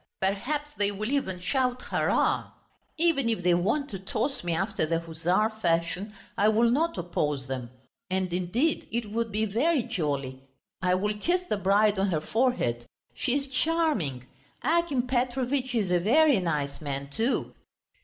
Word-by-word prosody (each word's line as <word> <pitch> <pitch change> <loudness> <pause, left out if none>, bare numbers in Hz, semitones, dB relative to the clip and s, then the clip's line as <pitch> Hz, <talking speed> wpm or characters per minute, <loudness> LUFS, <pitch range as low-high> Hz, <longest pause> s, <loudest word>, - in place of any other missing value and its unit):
Perhaps 265 +11 -1
they 200 -1 +3
will 215 +4 -3
even 190 -11 -1
shout 250 +6 0
hurrah! - - +1 0.4
Even 310 -7 +2
if 220 -6 -1
they 180 0 +4
want 220 +12 +1
to 195 - -5
toss 220 +8 -2
me 175 - -1
after 195 +4 -1
the 165 +1 +1
Hussar 170 +6 0
fashion 175 +4 0 0.2
I 210 +2 +4
will 230 +2 +4
not 320 +3 +1
oppose 150 -6 -1
them, 130 -3 -4 0.4
and 185 -1 -1
indeed 195 - 0
it 225 -2 -2
would 230 0 -1
be 215 +1 0
very 255 +7 +2
jolly! 140 -8 -3 0.4
I 180 -1 +3
will 210 +3 0
kiss 360 - +1
the 215 - 0
bride 200 +1 +3
on 195 - +2
her 170 -5 +1
forehead; 155 - 0 0.3
she 265 0 0
is 280 - -1
charming. 265 - 0 0.4
Akim 305 -4 +2
Petrovitch 250 +1 0
is 205 -6 +1
a 175 - +4
very 275 - +4
nice 150 -5 -2
man, 140 -2 -4
too. 230 - -1
210 Hz, 160 wpm, -27 LUFS, 175-255 Hz, 0.4 s, they